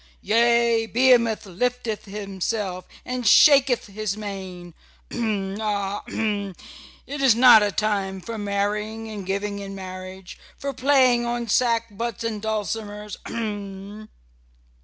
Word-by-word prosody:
Yea, 235 +1 +3
Behemoth 235 -3 +3
lifteth 225 +3 -2
himself 195 -1 -4 0.2
and 250 -2 -3
shaketh 270 +1 +6
his 210 0 -4
mane 190 -4 -7 0.4
h - - -6
m! 205 -3 -2
ah! 205 -1 -2
h - - -9
m! 205 -4 -2 0.5
It 285 +1 -5
is 260 -5 +5
not 240 -2 +8
a 205 -1 +1
time 200 -2 -1
for 225 +4 -6
marrying 210 +2 -2
and 200 -3 -7
giving 200 +1 -2
in 195 0 -7
marriage, 185 0 -9 0.2
for 280 0 -4
playing 255 -2 +3
on 240 0 -2
sackbuts 230 -1 0
and 220 -2 -3
dulcimers 210 -1 -4
h - - -7
m!" 205 -1 -6
210 Hz, 130 wpm, -23 LUFS, 200-235 Hz, 0.5 s, not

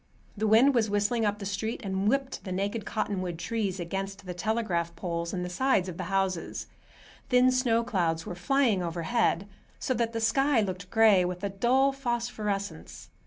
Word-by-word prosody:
The 215 +1 0
wind 235 +6 +6
was 225 -4 +2
whistling 205 +3 +1
up 205 0 0
the 200 - -7
street 210 +5 -3
and 195 0 -1
whipping 270 +1 -1
the 185 - -7
naked 200 +3 -2
cottonwood 185 -5 -2
trees 200 0 -2
against 195 +3 -4
the 180 - -5
telegraph 175 -4 -1
poles 170 0 -3
and 180 -1 -3
the - - -3
sides 190 0 +1
of 175 -2 -6
the 185 - -4
houses. 190 -2 -1 0.6
Thin 250 0 +5
snow 240 -3 +2
clouds 170 -8 -1
were - - -5
flying 220 +2 +2
overhead, 175 +3 0 0.3
so 255 - -1
that 230 -1 0
the 230 - -3
sky 265 +4 +3
looked 185 -3 -3
gray, 220 -5 +5
with 180 +1 -4
a 200 - 0
dull 250 +7 +3
phosphorescence. 215 - -4
205 Hz, 175 wpm, -28 LUFS, 180-230 Hz, 0.6 s, wind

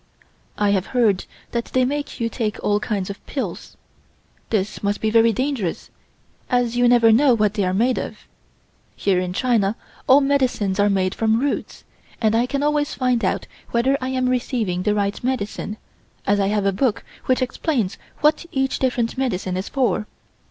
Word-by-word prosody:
I 205 -1 +2
have 195 0 0
heard 210 -6 +3 0.3
that 235 -1 -1
they 255 -1 +1
make 290 +2 -3
you 230 - 0
take 225 -3 -2
all 205 0 +2
kinds 200 -3 -2
of 200 - -11
pills. 275 - -5 0.7
This 210 -2 -1
must 205 0 -1
be 220 - 0
very 230 0 +5
dangerous, 250 - -2 0.6
as 245 -1 +1
you 245 0 +4
never 235 -2 +6
know 255 +2 +5
what 210 -2 +1
they 210 -2 0
are 185 - +1
made 240 +5 +2
of. - - -5 0.8
Here 190 -2 +1
in 180 0 -2
China 220 -1 +1 0.3
all 265 +2 +7
medicines 255 -8 +1
are 205 0 +4
made 190 -1 +1
from 225 0 +1
roots, 280 +2 -3 0.4
and 220 -1 +2
I 235 +2 +2
can 275 +2 -1
always 295 0 +1
find 250 -3 +1
out - - 0 0.2
whether 245 +4 +2
I 255 - -2
am 255 -1 0
receiving 235 -7 -1
the 210 +3 +1
right 200 +1 -1
medicine, 215 -4 -3 0.5
as 205 0 +2
I 195 - +2
have 205 0 0
a 195 - +3
book 230 +2 0 0.2
which 255 0 +2
explains 250 - -1 0.2
what 305 +3 +2
each 270 -1 0
different 250 -1 0
medicine 190 -8 -1
is 185 +1 -3
for. 245 -5 0
230 Hz, 180 wpm, -22 LUFS, 205-255 Hz, 0.8 s, all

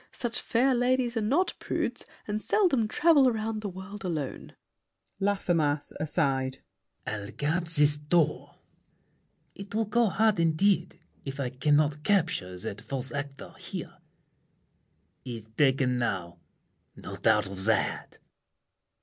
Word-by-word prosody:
Such 240 -2 -2
fair 255 +3 +2
ladies 250 0 +1
are 225 - 0
not 280 - +1
prudes, - - -3 0.2
And 210 0 -2
seldom 275 - +2
travel 285 +1 +4
round 220 -1 -3
the 205 - -3
world 190 +2 -9
alone. 160 -7 -4 0.6
LAFFEMAS 170 -7 0
(aside). 135 -4 -1 0.4
I'll 105 -2 -4
guard 165 +4 -1
this 150 -2 +5
door. 150 +1 0 1.0
It 200 +1 -9
will 225 0 +1
go 230 +2 +2
hard, 215 0 +2
indeed, 170 +2 +2 0.2
If 135 0 -6
I 130 -3 -2
can't 145 +3 +2
capture 160 - +1
that 100 +3 -6
false 135 -1 -5
actor 140 -1 -6
here. - - -7 1.2
He's 115 -4 -6
taken 130 -2 +2
now—no 95 -8 -7
doubt 105 -2 +3
of 95 0 -3
that! 110 -2 0
165 Hz, 120 wpm, -28 LUFS, 135-215 Hz, 1.2 s, this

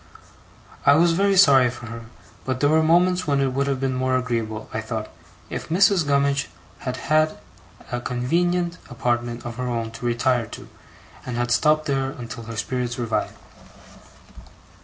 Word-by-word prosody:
I 140 - +6
was 170 +2 +4
very 195 +3 +2
sorry 135 -9 +6
for 120 0 -9
her; 115 0 -8 0.4
but 130 -1 -2
there 145 - +3
were 160 0 +4
moments 180 +2 +3
when 140 -1 +2
it 135 -2 +1
would 140 +1 0
have 135 -2 -1
been 135 0 -1
more 130 0 0
agreeable, 115 -4 -3
I 110 - -2
thought, 110 -1 -5 0.4
if - - -6
Mrs. 185 -1 +3
Gummidge 140 0 +1 0.3
had 125 - -4
had 155 0 +1 0.5
a 120 0 -2
convenient 170 +9 0
apartment 120 -1 -2
of 120 -1 -6
her 125 0 -3
own 115 -2 -2
to 115 +1 -8
retire 120 0 +1
to, - - -10 0.6
and 120 -1 -5
had 120 0 -1
stopped 155 +4 +3
there 135 -2 0
until 115 -4 -8
her 115 0 -7
spirits 125 +1 -2
revived. 115 -3 -2
130 Hz, 165 wpm, -23 LUFS, 120-155 Hz, 0.6 s, I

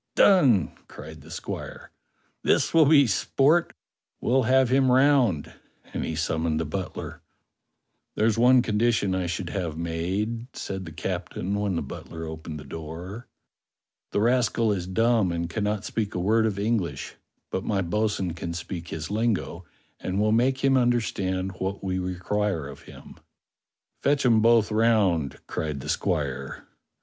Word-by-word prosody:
"Done!" 135 - +5 0.2
cried 80 0 -11
the 80 - -15
squire. - - -7 0.5
"This - - +2
will 160 -3 +6
be 145 -2 +6
sport; 140 - +2 0.5
we'll 130 +2 +2
have 130 -1 +4
him 130 0 +3
round," 130 - +3 0.4
and - - -2
he 80 - -3
summoned 80 0 -1
the 80 - -1
butler. 95 +5 -5 0.9
"There's 110 0 +2
one 125 +1 +5
condition 110 -3 +1
I 95 -1 -1
should 85 +1 -4
have 85 -6 -3
made," 95 +8 -2
said 95 -1 -5
the 80 - -8
captain 90 +2 -4
when 100 -2 -1
the - - -1
butler 80 0 -8
opened 80 -1 -7
the - - -9
door. 80 - -8 0.8
"The 100 - 0
rascal 115 -1 +2
is 90 -3 -2
dumb 110 0 +2
and 85 0 -2
cannot 105 +2 -2
speak 110 -3 -3
a - - -1
word 110 +5 +3
of 100 -3 -3
English; 105 -3 -2 0.4
but 95 - -2
my 100 -3 0
bo'sun 100 -1 -1
can 85 0 -5
speak 85 0 -6
his 80 +3 -5
lingo 105 -5 -1 0.3
and 95 +2 -2
will 105 +1 +2
make 130 +4 +2
him 135 -1 +4
under 120 -1 +3
stand 95 -3 -2
what 95 +2 -3
we 95 -1 -1
require 90 -2 -2
of 70 - -10
him." - - -13 0.8
"Fetch 140 -1 +2
'em 115 -3 +5
both 115 -1 +4
round," 105 - +2
cried 75 -3 -3
the - - -7
squire. 70 -5 -2
100 Hz, 155 wpm, -26 LUFS, 85-115 Hz, 0.9 s, will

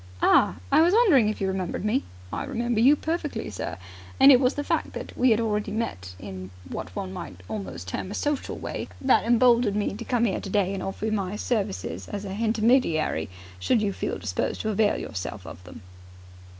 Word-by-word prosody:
"Ah, - - +5 0.2
I - - +6
was 350 +5 +4
wondering 320 - +5
if 215 - -4
you 195 - 0
remembered 190 0 -3
me!" 240 +6 +1 0.3
"I - - -2
remember 235 -1 -1
you 265 +6 +6
perfectly, 315 - -3
sir, 95 - -5 0.4
and 275 +1 +9
it 255 - +7
was 255 -1 +2
the 290 - -2
fact - - -1
that - - -7
we 255 +1 +3
had 220 -1 +4
already 210 -2 -1
met 95 - -4
in 95 -1 -8 0.2
what - - -6
one 190 -2 -4
might 100 - -8
almost 90 -5 -6
term 185 - -4
a 205 - -5
social 290 -2 -2
way - - -5
that 265 -1 +3
emboldened 235 -2 +4
me 210 -1 0
to 220 +3 -6
come 235 -1 +1
'ere 200 - -1
today 195 -1 0
and 195 - -4
offer 195 +2 -4
you 220 - 0
my 200 -2 -1
services 145 - -2
as 200 0 -5
a 190 - -5
hintermediary, 220 - +1 0.3
should 95 - +2
you 200 -1 0
feel - - -3
disposed 95 -3 -2
to 220 - -2
avail 210 0 +2
yourself 95 -1 -6
of 90 - -10
them." 90 +3 -12
210 Hz, 205 wpm, -26 LUFS, 160-240 Hz, 0.4 s, and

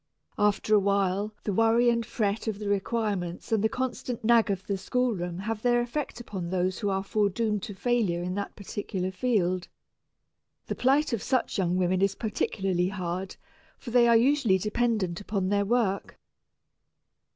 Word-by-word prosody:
After 210 +1 +2
a 210 - +7
while 200 +1 +1
the 205 - -1
worry 225 +3 +4
and 235 0 0
fret 215 -1 -2
of 215 -2 -1
the 210 0 -5
requirements 200 -2 -2
and 220 -2 +2
the 220 - +3
constant 250 -1 -3
nag 230 -1 +4
of 195 -1 -2
the 200 - -1
schoolroom 190 -4 -1
have 215 +3 -3
their 240 0 +3
effect 245 +3 -3
upon 190 -7 -5
those 185 0 0
who 205 - -1
are 195 0 0
foredoomed 210 +1 0
to 205 - -7
failure 205 -6 0
in 180 +1 -3
that 200 +1 -4
particular 190 -2 -4
field. 185 -5 0 1.0
The - - -3
plight 275 +2 +2
of 225 - -1
such 255 -5 0
young 180 -1 +1
women 185 0 +1
is 195 0 +2
particularly 195 -4 -1
hard, 185 0 -4 0.4
for 240 - -8
they 240 0 +5
are 235 -1 +6
usually 245 -5 +3
dependent 210 -3 -1
upon 195 -2 -2
their 200 0 +2
work. 210 -3 0
205 Hz, 165 wpm, -27 LUFS, 190-235 Hz, 1.0 s, a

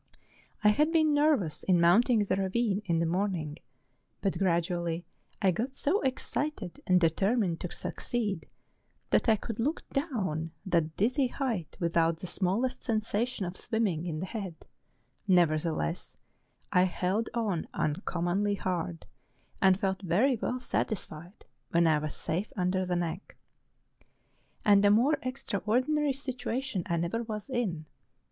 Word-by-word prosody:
I 210 - +7
had 300 +9 +3
been 315 -2 +4
nervous 290 - +2
in 180 -2 +3
mounting 215 +6 +5
the 200 - 0
ravine 195 +2 0
in 170 -3 +1
the 165 - +2
morning, 170 -3 -1 0.6
but 195 - -1
gradually 170 -2 0 0.4
I 190 - +5
got 245 +9 -3
so 350 +9 +1
excited 265 - -3
and 185 0 +5
determined 180 +2 +1
to 180 - -5
succeed, 210 -8 -3 0.6
that - - +3
I 220 - +6
could 225 +1 -6
look 290 +8 -1
down 190 - -2
that 165 -4 0
dizzy 255 +6 +2
height 240 - -3
without 165 -1 +2
the 175 - -7
smallest 200 +8 -1
sensation 225 0 -1
of 175 +1 -5
swimming 190 -8 -1
in 155 -2 -3
the - - -2
head: 190 -5 -6 0.6
never¬ 170 -4 +4
theless, 155 - -3 0.6
I 180 0 +5
held 185 +4 -1
on 210 -8 -1
uncommonly 175 +5 0
hard, 175 - -3 0.6
and 190 0 +5
felt 190 -2 -1
very 205 +9 +3
well 250 +3 -2
satisfied 185 -7 -4 0.2
when 170 0 +3
I 155 -2 +4
was 150 -1 -4
safe 185 +6 -2
under 185 0 0
the 180 - 0
neck. 175 +2 -4 1.3
And 205 -2 +6
a 205 - +6
more 260 +8 +4
extraordinary 255 +3 0
situation 260 -4 -3
I 170 - 0
never 170 +8 -1
was 220 +2 -6
in. 195 -11 -1
195 Hz, 140 wpm, -30 LUFS, 170-235 Hz, 1.3 s, I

